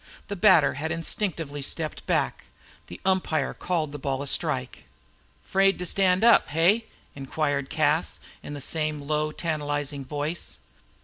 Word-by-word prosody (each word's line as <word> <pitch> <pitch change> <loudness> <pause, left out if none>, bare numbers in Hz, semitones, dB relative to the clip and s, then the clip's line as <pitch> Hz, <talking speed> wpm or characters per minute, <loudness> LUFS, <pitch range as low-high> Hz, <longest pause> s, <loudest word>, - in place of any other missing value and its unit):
The 200 - -2
batter 175 -4 +5
had 155 +4 -3
instinctively 165 -3 -2
stepped 155 +2 -2
back. - - 0 0.4
The 90 - -9
umpire 180 -7 +1
called 165 -5 -2
the 145 - -7
ball 135 0 -2
a - - -6
strike. 65 - -1 0.6
"'Fraid 195 0 +3
to 180 - -4
stand 185 +2 +3
up, 235 - +6
hey?" 180 +9 +3 0.3
Inquired 140 0 -2
Cas, 155 +1 +1 0.2
in 145 - -7
the 145 - -6
same 155 0 -2
low, 150 +1 0
tantalizing 145 -3 -3
voice. 150 +5 -3
155 Hz, 140 wpm, -26 LUFS, 145-175 Hz, 0.6 s, up